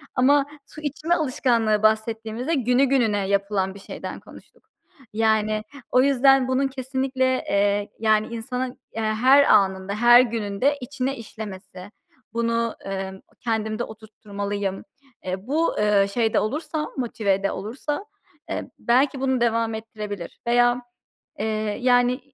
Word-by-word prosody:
Ama 275 +2 +4 0.2
su 310 - -12
içme 305 +3 -1
alışkanlığı 235 -8 +1
bahsettiğimizde 220 +5 0
günü 250 -1 +2
gününe 225 -7 +1
yapılan 200 -1 0
bir - - -10
şeyden 195 - -7
konuştuk. - - -17 0.4
Yani, 215 -1 +1 0.3
o 250 - +5
yüzden 270 -1 +4
bunun 260 +1 +1
kesinlikle, 260 0 -2 0.2
eee, 205 +1 +1
yani, 215 -1 +2
insanın, 250 +2 -4 0.2
eee, 225 - -2
her 245 +6 +5
anında, 190 -4 +3
her 240 +2 +7
gününde 230 +3 0
içine 270 +1 -3
işlemesi, 205 -4 -9 0.4
bunu, 230 0 0
emm, 190 -1 -5 0.2
kendimde 220 -1 -2
oturtturmalıyım, 205 -2 -5 0.4
eee, 185 +4 -4
bu, 320 +4 +1
eee, 210 -1 +3
şeyde 225 -2 +2
olursa, 305 +6 -2
motivede 200 -5 0
olursa, 280 - -4 0.4
eee, - - -4
belki 265 +3 +2
bunu 260 -2 +1
devam 230 -1 +1
ettirebilir 210 -4 -7
veya, 245 +1 +3 0.6
eee, 215 - -1 0.4
yani, 245 +1 +3
230 Hz, 120 wpm, -23 LUFS, 210-260 Hz, 0.6 s, her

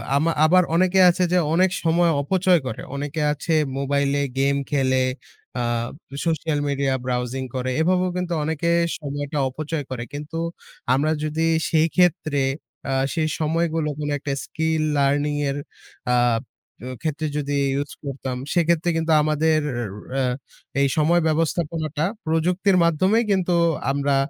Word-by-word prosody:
আমা 155 +4 +2
আবার 180 +3 +5
অনেকে 185 +2 +3
আছে 180 +1 +1
যে 180 - +3 0.2
অনেক 185 +3 +4
সময় 170 +1 +3
অপচয় 180 +3 +3
করে, 110 - -5
অনেকে 145 +2 -3
আছে 155 +3 -2 0.2
মোবাইলে 140 0 +1 0.2
গেম 140 +1 +2 0.2
খেলে, 130 -2 +2 0.6
আ - - 0 0.6
social 160 -2 0
media 140 -1 0
browsing 125 +1 -2
করে 130 0 -2
এভাবেও 180 +2 +2
কিন্তু 180 -1 -2
অনেকে 160 +2 -1 0.3
সময়টা 145 0 -4
অপচয় 155 +3 -4
করে। 125 -2 -3
কিন্তু 150 +3 -6 0.6
আমরা 145 +4 +2
যদি 155 +1 -1 0.2
সেই 160 0 +3
ক্ষেত্রে 155 -5 +2 0.5
আ - - 0 0.2
সেই 160 -2 0
সময়গুলো 160 0 0
কোন 150 -1 -2
একটা 140 0 -3
skill 160 -1 -1 0.2
learning 145 +1 +1
এর 140 - -2 0.6
আব 120 -2 +2 0.4
এ - - -6
ক্ষেত্রে 155 -1 -2
যদি 145 -1 -2 0.3
use 145 - -7
করতাম, 135 -2 -4 0.2
সেক্ষেত্রে 170 0 +2
কিন্তু 165 0 0
আমাদের 155 +1 +2 0.2
র - - -2 0.4
আ - - +1 0.6
এই 140 - +4
সময় 170 +3 +3
ব্যবস্থাপনাটা 160 -1 -1 0.2
প্রযুক্তির 180 +4 +2
মাধ্যমেই 185 +8 +3
কিন্তু 185 -2 +1 0.4
আমরা 140 0 +1
155 Hz, 140 wpm, -23 LUFS, 140-170 Hz, 0.6 s, আবার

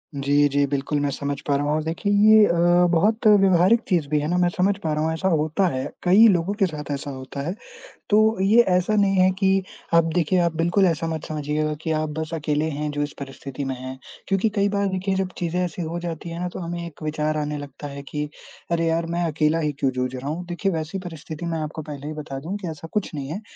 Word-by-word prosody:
जी, 140 0 -1 0.2
जी, 140 +1 +2
बिल्कुल 140 +1 -1
मैं 145 0 0
समझ 140 0 -3
पा 140 - +2
रहा 145 +1 0
हूँ 145 - 0
और 155 0 0
देखिए 165 +6 -1 0.2
ये 215 -1 +8
अ, - - +1 0.4
बहुत 215 +7 +2
व्यावहारिक 195 +1 +5
चीज़ 170 -6 +1
भी 150 0 +2
है 150 - -2
ना, 180 - +1
मैं 175 -1 +3
समझ 190 +2 +2
पा 155 -1 0
रहा 155 0 0
हूँ 160 0 0
ऐसा 165 +4 -1
होता 160 +2 +2
है, 130 +1 -2 0.2
कई 200 +6 +7
लोगों 175 +2 0
के 195 - +5
साथ 150 -4 -5
ऐसा 140 0 -4
होता 130 +1 -7
है। 175 - -1 0.6
तो 215 +1 +4
ये 210 +5 +6
ऐसा 180 +4 +1
नहीं 200 -2 +3
है 185 0 +5
कि 195 -1 +3 0.3
आप 165 0 +6
देखिए, 180 +1 +2
आप 170 -2 +1
बिल्कुल 175 +4 +2
ऐसा 165 -2 0
मत 155 - -7
समझिएगा 155 0 -2
कि 160 - -2
आप 155 0 0
बस 160 0 -4
अकेले 155 -1 0
हैं 150 0 -3
जो 145 0 -2
इस 145 - -5
परिस्थिति 135 0 -6
में 135 -1 -2
हैं। 130 +1 -7 0.3
क्योंकि 195 +3 +2
कई 200 -1 +2
बार 200 0 0
देखिए 190 +1 -1
जब 190 -1 -1
चीज़ें 175 0 -1
ऐसी 175 0 -5
हो 165 +1 -3
जाती 170 -1 -5
हैं 165 0 -6
ना, 180 - -2
तो - - -8
हमें 170 -1 -4
एक 160 -2 -10
विचार 155 0 -1
आने 150 0 -2
लगता 145 0 -8
है 140 0 -7
कि 150 0 -2 0.4
अरे 165 -1 +1
यार, 165 +1 +1
मैं 170 +1 -2
अकेला 155 +2 +1
ही 150 -2 0
क्यों 135 - +2
जूझ 125 0 -2
रहा 130 +3 -5
हूँ। 170 +4 -4
देखिए 180 +3 -1
वैसी 165 +2 -3
परिस्थिति 160 0 -7
मैं 165 -1 -2
आपको 155 +1 -5
पहले 145 -1 -8
ही 155 - -4
बता 150 -3 -6
दूँ 165 +8 -5
कि 185 - -4
ऐसा 160 +1 -9
कुछ 210 -5 -1
नहीं 140 -2 -4
है, 180 +7 -4
160 Hz, 250 wpm, -23 LUFS, 150-185 Hz, 0.6 s, ये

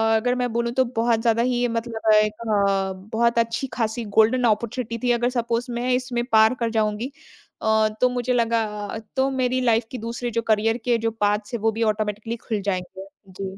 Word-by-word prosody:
अगर 245 +3 +1
मैं 245 -2 -1
बोलूँ 235 0 0
तो 260 0 +2
बहुत 230 0 +2
ज़्यादा 230 -1 +2
ही 245 0 +1
मतलब 230 -1 -1
एक 215 0 +4 0.2
अ, 195 -2 +1 0.2
बहुत 235 +1 +2
अच्छी-खासी 230 0 -2
गोल्डन 240 +3 +4
ऑपर्च्युनिटी 230 +1 -1
थी। - - +4
अगर 240 +1 +1
सपोज़ 235 +1 -2
मैं 240 +2 -2
इसमें 250 -1 -1
पार 220 +2 +6
कर 230 -1 0
जाऊँगी 220 +4 -1 0.5
अ, 220 0 +3
तो 250 - +5
मुझे 250 0 -1
लगा 230 -1 +2 0.2
अ, 220 - -5 0.2
तो 265 +1 +2
मेरी 255 -1 0
लाइफ 230 -2 +2
के 255 - -5
दूसरे 235 +1 -4
जो 230 +1 0
करियर 225 +1 +1
के 240 -1 +3
जो 225 0 -1
पाथ्स 210 0 -1
हैं, 235 - -1
वो 225 0 +2
भी 225 +1 -2
ऑटोमेटिकली 215 +1 -1
खुल 215 -4 -1
जाएँगे। 190 0 -4 0.2
जी। 190 +1 -6
230 Hz, 195 wpm, -23 LUFS, 215-240 Hz, 0.5 s, पार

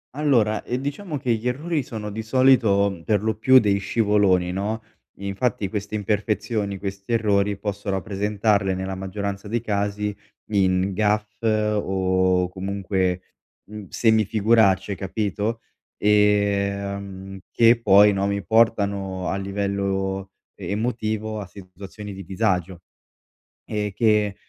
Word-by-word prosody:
Allora, 120 -8 +2
ehm, 125 - -3
diciamo 145 +4 -4
che 125 -3 0
gli 115 +2 -3
errori 150 +5 -1
sono 105 -4 -6
di 110 +2 -4
solito 110 -6 +3
per 105 -2 +1
lo 110 0 +1
più 130 +5 +5
degli 100 -5 +3
scivoloni, 100 -3 +2
no. 105 +4 -3 0.3
Infatti 100 +1 -2
queste 105 +1 -4
imperfezioni, 105 0 -1
questi 100 +3 -5
errori 100 -3 +1
posso 100 0 -4
rappresentarle 100 +1 0
nella 95 +1 -4
maggioranza 100 +2 -5
dei 115 +2 -1
casi 105 -1 -2 0.4
in 95 -1 +2
gaffe 105 +2 -1
o 95 -4 +1
comunque, 95 -1 -2 0.4
mhmm, 105 -2 -9
semi-figuracce, 110 -3 +3
capito, 105 +3 -3 0.4
ehm, 100 -2 0
che 115 0 +4
poi 105 0 +6
no, 100 0 0
mi 100 -1 -2
portano 100 -4 +1
a - - -1
livello 100 -1 -2 0.2
emotivo 110 +2 -3
a 100 - -7
situazioni 100 +2 -10
di 95 0 -8
disagio. 95 -2 -1 0.8
E 105 -2 -3
che, 105 -3 +2
100 Hz, 120 wpm, -23 LUFS, 95-110 Hz, 0.8 s, poi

